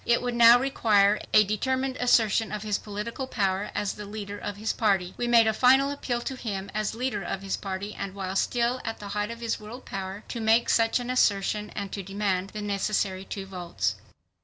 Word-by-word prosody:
It 235 Hz, -, +3 dB
would 245 Hz, -1 st, -1 dB
now 235 Hz, 0 st, +8 dB
require 215 Hz, -6 st, +3 dB
a 215 Hz, -, +7 dB
determined 260 Hz, +6 st, -1 dB
assertion 225 Hz, -3 st, +3 dB
of 210 Hz, -1 st, -4 dB
his 210 Hz, -2 st, -1 dB
political 215 Hz, +5 st, -5 dB
power 195 Hz, -4 st, -1 dB
as 205 Hz, -, -1 dB
the 210 Hz, -, -8 dB
leader 205 Hz, -1 st, -6 dB
of 205 Hz, -1 st, -5 dB
his 215 Hz, +2 st, -1 dB
party. 195 Hz, -5 st, +1 dB
We 240 Hz, -, -2 dB
made 235 Hz, -1 st, +6 dB
a 220 Hz, -, +2 dB
final 265 Hz, +4 st, +4 dB
appeal 250 Hz, -4 st, -3 dB
to 265 Hz, -, -4 dB
him 200 Hz, -6 st, -5 dB
as 215 Hz, +1 st, -2 dB
leader 245 Hz, -4 st, -2 dB
of 195 Hz, -, -4 dB
his 195 Hz, -, -1 dB
party 195 Hz, +1 st, -5 dB
and 195 Hz, -1 st, -6 dB
while 190 Hz, -1 st, -4 dB
still 240 Hz, +5 st, +1 dB
at 225 Hz, -1 st, -4 dB
the 205 Hz, -, -8 dB
height 210 Hz, +1 st, -2 dB
of 230 Hz, 0 st, -7 dB
his 230 Hz, -1 st, -2 dB
world 225 Hz, +5 st, -10 dB
power, 195 Hz, +1 st, -6 dB
to 235 Hz, -, -4 dB
make 225 Hz, +1 st, +3 dB
such 225 Hz, +1 st, +3 dB
an 245 Hz, 0 st, -3 dB
assertion 210 Hz, -3 st, +1 dB
and 200 Hz, -2 st, -4 dB
to 200 Hz, -, -4 dB
demand 195 Hz, -1 st, -2 dB
the 210 Hz, 0 st, -6 dB
necessary 200 Hz, -1 st, -1 dB
two 195 Hz, 0 st, -6 dB
votes. 175 Hz, -, -2 dB
210 Hz, 210 wpm, -27 LUFS, 195-235 Hz, -, now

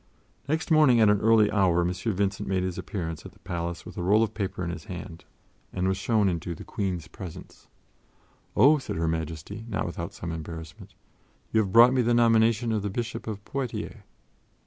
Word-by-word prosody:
Next 160 Hz, +3 st, -1 dB
morning 150 Hz, -7 st, +6 dB
at 110 Hz, -2 st, +6 dB
an 105 Hz, -, +1 dB
early 110 Hz, -1 st, +5 dB
hour 95 Hz, -5 st, +3 dB
M. 90 Hz, +1 st, 0 dB
Vincent 100 Hz, 0 st, -2 dB
made 95 Hz, -1 st, +1 dB
his 90 Hz, -1 st, -3 dB
appearance 80 Hz, -7 st, -5 dB
at -, -, -11 dB
the -, -, -23 dB
palace 85 Hz, 0 st, -4 dB
with -, -, -10 dB
a -, -, -1 dB
roll 105 Hz, +5 st, +4 dB
of 110 Hz, -, -2 dB
paper 95 Hz, -3 st, -3 dB
in 85 Hz, -, -2 dB
his 85 Hz, +2 st, -8 dB
hand 90 Hz, -3 st, -8 dB, 0.5 s
and 90 Hz, 0 st, -1 dB
was 95 Hz, -, +1 dB
shown 110 Hz, -2 st, +2 dB
into 85 Hz, -1 st, -2 dB
the -, -, -10 dB
Queen's 90 Hz, -5 st, -3 dB
presence. 90 Hz, -1 st, -10 dB, 0.9 s
"Oh," 150 Hz, +3 st, +6 dB
said -, -, -5 dB
Her 80 Hz, 0 st, 0 dB
Majesty, 80 Hz, +6 st, -4 dB
not 105 Hz, -, -1 dB
without 85 Hz, -1 st, -5 dB
some 85 Hz, -, -5 dB
embarrassment, 80 Hz, -1 st, -8 dB, 0.6 s
"you 110 Hz, -, +3 dB
have 100 Hz, -3 st, 0 dB
brought 120 Hz, +3 st, +7 dB
me 130 Hz, -, +3 dB
the 120 Hz, 0 st, +2 dB
nomination 115 Hz, 0 st, +3 dB
of 110 Hz, -2 st, 0 dB
the 100 Hz, -, -2 dB
Bishop 115 Hz, +4 st, -4 dB
of 105 Hz, -2 st, -5 dB
Poitiers." 135 Hz, -4 st, -4 dB
100 Hz, 195 wpm, -27 LUFS, 85-115 Hz, 0.9 s, brought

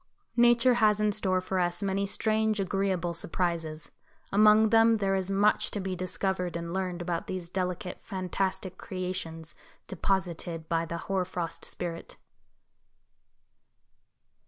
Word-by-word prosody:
Nature 240 Hz, +1 st, +5 dB
has 215 Hz, -3 st, +3 dB
in 210 Hz, 0 st, +2 dB
store 190 Hz, -3 st, +1 dB
for 185 Hz, 0 st, -2 dB
us 175 Hz, +1 st, 0 dB
many 200 Hz, 0 st, 0 dB
strange, 220 Hz, +1 st, +1 dB
agreeable 190 Hz, -2 st, 0 dB
surprises. 165 Hz, -2 st, -2 dB, 0.4 s
Among 215 Hz, +2 st, +6 dB
them 225 Hz, 0 st, +5 dB
there 195 Hz, -2 st, 0 dB
is 190 Hz, -1 st, 0 dB
much 200 Hz, +2 st, +3 dB
to 205 Hz, -, -4 dB
be 190 Hz, -1 st, -3 dB
discovered 185 Hz, -1 st, -2 dB
and 170 Hz, 0 st, -5 dB
learned 185 Hz, -2 st, -2 dB
about 170 Hz, -1 st, -3 dB
these 180 Hz, -2 st, -4 dB
delicate 180 Hz, -1 st, -3 dB
fantastic 190 Hz, -1 st, -3 dB
creations 180 Hz, -4 st, -5 dB, 0.3 s
deposited 175 Hz, -3 st, -2 dB
by 165 Hz, 0 st, 0 dB
the 170 Hz, -, -4 dB
Hoar 195 Hz, -1 st, 0 dB
frost 175 Hz, -2 st, -4 dB
Spirit. 170 Hz, -1 st, -6 dB
185 Hz, 130 wpm, -29 LUFS, 175-200 Hz, 0.4 s, Among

